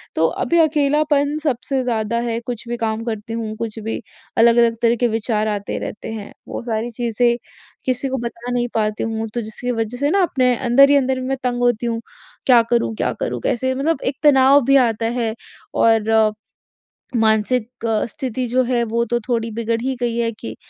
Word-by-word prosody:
तो - - +3 0.2
अभी 340 - +1
अकेलापन 295 -1 +2
सबसे 265 -1 -1
ज़्यादा 230 -2 -1
है, 235 -1 -2
कुछ 235 -1 -6
भी 240 - -2
काम 225 -1 -2
करती 225 -1 -4
हूँ, 225 -1 -4
कुछ 225 -1 -4
भी 220 +1 -4 0.4
अलग-अलग 230 0 +5
तरह 235 0 +4
के - - +5
विचार 220 -1 -1
आते 205 -1 -3
रहते 220 - -6
हैं। 210 -2 -7 0.2
वो - - -5
सारी 225 0 -2
चीज़ें 235 0 +1 0.5
किसी 255 +1 0
को 265 - -2
बता 235 0 -5
नहीं 245 0 0
पाती 215 -1 0
हूँ, 225 0 -2
तो 240 - -1
जिसकी 225 +3 -4
वजह 225 0 -2
से 285 +3 +1
ना 395 - +3
अपने 255 -6 +2
अंदर 260 +3 +5
ही 285 - +5
अंदर 265 -1 +2
मैं 265 +1 -2
तंग 245 -1 -1
होती 240 -1 +1
हूँ, 230 -1 -2 0.4
क्या 245 -3 +7
करूँ? 235 -1 +1
क्या - - 0
करूँ? - - -2
कैसे? 260 +2 0
मतलब 295 +4 0
एक 265 - 0
तनाव 280 -1 +6
भी 275 +2 +4
आता 225 0 -2 0.2
है। 225 -1 -1 0.4
और 220 -1 +3 0.8
मानसिक 220 +1 +2 0.4
स्थिति 255 -4 -3
जो 250 +2 +2
है 240 -1 +1
वो 235 0 +1
तो 240 +1 0
थोड़ी 230 -2 0
बिगड़ 230 +1 -1
ही 260 +1 -1
गई 240 -1 0
है 230 -1 0
कि 110 - -7
235 Hz, 190 wpm, -20 LUFS, 225-255 Hz, 0.8 s, क्या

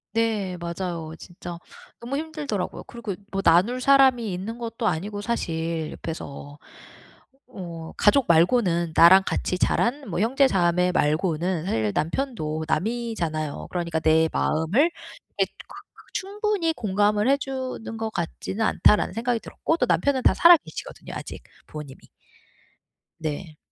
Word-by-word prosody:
네. 215 -5 0
맞아요. 170 -2 -5
진짜 175 -1 -9 0.4
너무 250 +4 -3
힘들더라고요. 295 - -4
그리고 230 -5 -6 0.2
뭐 195 - -1
나눌 195 +9 +4
사람이 255 -5 +4
있는 200 +6 -5
것도 230 -1 -3
아니고 205 +4 -2
사실 165 -7 -2
옆에서. 145 -3 -7 1.0
어 165 -3 -7
가족 245 +5 +4
말고는 170 -1 +3
나랑 185 +3 +8
같이 180 - -1
자란 250 +7 0
뭐 175 - -2
형제자매 185 -8 +3
말고는 165 +2 0
사실 110 - 0
남편도 160 - -2
남이잖아요. 175 -8 -2
그러니까 170 -2 -2
'내 160 0 +3
마음을 160 - +2 0.5
이렇게 - - 0 0.6
충분히 400 -3 -1
공감을 210 -2 +1
해 275 - +6
주는 260 -4 -5
것 225 0 -2
같지는 190 +4 -3
않다.'라는 210 -2 +3
생각이 235 +2 -1
들었고 325 - -2
또 - - +2
남편은 280 -2 +2
다 - - +5
살아 345 +1 +8
계시거든요 - - -9
아직 - - -7 0.2
부모님이. 150 -3 -9 1.2
네. 155 0 -5
195 Hz, 300 characters per minute, -24 LUFS, 165-240 Hz, 1.2 s, 나랑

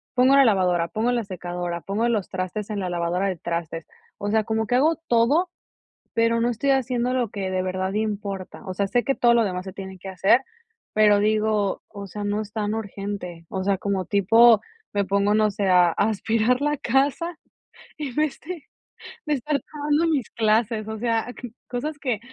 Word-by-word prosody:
pongo 260 +2 +5
la 275 - +7
lavadora, 180 -7 +2
pongo 225 +7 0
la 240 -2 0
secadora, 175 -2 -5
pongo 210 +8 -1
los 215 -5 -1
trastes 195 +3 -4
en 205 - -2
la 185 -2 -2
lavadora 175 +2 0
de 185 -3 -2
trastes. 170 -1 -4 0.3
O 205 0 -3
sea, 220 0 +3
como 220 +1 -1
que 235 - -3
hago 305 +6 +4
todo, 280 +10 +3 0.6
pero, 230 0 +2
no 240 - +2
estoy 275 +4 0
haciendo 250 -1 +1
lo 245 -4 0
que 195 -2 -4
de 185 0 0
verdad 185 +1 -2
importa, 205 -2 -4
o 185 - -4
sea, 200 +1 0
sé 240 +3 +1
que 275 - +1
todo 240 -2 +4
lo 230 - +4
demás 180 -3 -2
se 190 - -7
tiene 190 -1 -8
que 190 - -8
hacer, 195 +7 +3 0.5
pero 210 -1 +5
digo, 215 -1 +1
o 200 -1 -9
sea, 205 +2 -6
no 205 +1 -1
es 210 -1 -8
tan 210 0 -2
urgente, 200 -5 -5
o 190 - -3
sea, 195 0 +1
como 195 -1 -2
tipo 225 +4 +6 0.3
me 200 -1 0
pongo, 200 +2 +2
no 215 -1 +3
sé, 200 -1 -1
a 180 -2 +5
a - - -6 0.2
aspirar 225 +4 +1
la 295 0 +1
casa, 285 +7 0 0.6
en 280 -5 -5
vez 300 -2 0
de 350 -3 -6 0.7
de 300 - +1
estar 280 +2 -1
tomando 300 +2 +1
mis 285 -7 0
clases, 220 0 +1
o 220 0 -4
sea, 230 -1 0
c 245 - -7 0.2
cosas 290 +5 -4
que 250 -6 -1
215 Hz, 200 wpm, -24 LUFS, 195-245 Hz, 0.7 s, la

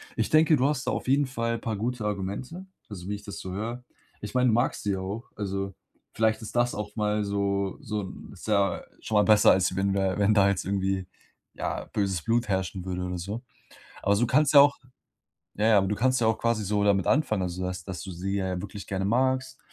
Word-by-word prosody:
Ich 110 - 0
denke, 155 0 +5
du 130 +2 +3
hast 145 -2 -2
da - - +2
auf - - -3
jeden 140 +2 +3
Fall 115 -3 -2
paar 115 -1 -3
gute 115 +1 -2
Argumente, 105 - -4 0.2
also, 95 -4 -8
wie 105 - -1
ich 100 - -10
das 100 - -7
so 95 - -6
höre. 115 +6 -4 0.4
Ich 105 - -6
meine, 125 0 +4
du - - +3
magst 120 +3 +1
sie 100 -1 0
ja 95 - -2
auch, 100 +5 -6
also, 100 -1 -3 0.4
vielleicht 110 0 +2
ist 110 - -8
das 120 0 +2
auch 105 0 -5
mal 105 -1 0
so 100 -1 -1
so 105 -5 -3
'n 95 - -9
ist 95 - -11
ja 100 -4 +1 0.2
schon 110 - -3
mal 105 - +5
besser, 105 -1 +6
als 95 0 +2
wenn 95 0 +1
du 100 - +1
da 95 0 0
wenn 100 +1 +4
da 100 -2 +5
jetzt 100 - -1
irgendwie, 95 -1 -1 0.5
ja, - - -3
böses 95 -4 0
Blut 115 0 +1
herrschen 95 -1 -1
würde 90 -1 -3
oder 90 0 -3
so. 105 +8 -5 0.6
Aber 100 - +3
du 120 +4 +2
kannst 145 +4 +3
ja 140 - +11
auch 145 0 +5 0.8
ja, 105 +2 +2
ja, 110 - +6
aber 95 -1 +3
du 105 - 0
kannst 130 +4 +2
ja 110 - +3
auch 110 - +2
quasi 115 -2 0
so 105 +1 +1
damit 100 -2 +3
anfangen. 110 -10 +2
Also, 90 +1 -4
dass 90 -1 -4
dass 95 -3 -6
du 95 - -7
sie 95 +3 -3
ja 95 -2 -2
wirklich 100 - -8
gerne 95 -1 -2
magst 130 +3 0
105 Hz, 235 wpm, -27 LUFS, 95-115 Hz, 0.8 s, ja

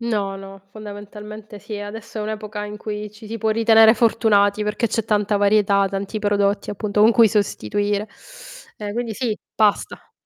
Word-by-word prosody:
No, 205 -4 -2
no, 195 0 -11
fondamentalmente 210 0 -10
sì, 210 +1 -7
adesso 220 +2 -8
è - - -2
un'epoca 210 0 -5
in 210 0 -7
cui 210 0 -6
ci 210 +1 -14
si 225 +2 -5
può 220 0 -1
ritenere 225 0 +6
fortunati 215 -3 +3
perché 210 +3 -1
c'è 225 0 -2
tanta 210 -1 +1
varietà, 200 -1 +3
tanti 200 +2 -4
prodotti, 205 0 0
appunto, 210 0 -2
con 215 +2 +7
cui 230 0 +6
sostituire. 205 - -1 0.7
E 205 -1 -5
quindi 235 0 -3
sì, 220 -1 -2 0.2
pasta. 210 -2 0
210 Hz, 165 wpm, -21 LUFS, 205-220 Hz, 0.7 s, con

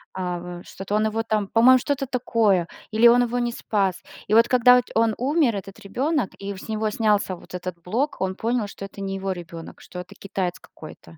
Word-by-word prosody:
А 180 -1 -3
вот 175 0 -8
что-то 195 +2 -5
он 215 +1 +2
его 225 +1 -1
там. 215 -3 -1
По-моему, 245 +4 +6
что-то 275 0 -2
такое 220 -8 +1 0.2
или 220 +2 +6
он 245 +1 +6
его 245 +1 -2
не 240 0 0
спас. 200 -5 -1 0.3
И 210 - -1
вот 230 +1 +6
когда 250 0 +6
он 225 -1 +3
умер, 270 -3 +2
этот 195 +1 -7
ребёнок, 255 - -1
и 200 0 -5
с 190 - -10
него 215 0 0
снялся 210 -3 +1
вот - - -16
этот 180 0 -5
блок, 240 - -1
он 190 0 -1
понял, 230 -1 -1
что 195 - -8
это 200 0 -10
не 195 0 -3
его 195 0 -3
ребёнок, 170 -2 -8
что 180 - -9
это 180 - -10
китаец 190 -3 -3
какой-то. 80 -1 -13
210 Hz, 210 wpm, -24 LUFS, 190-235 Hz, 0.3 s, По-моему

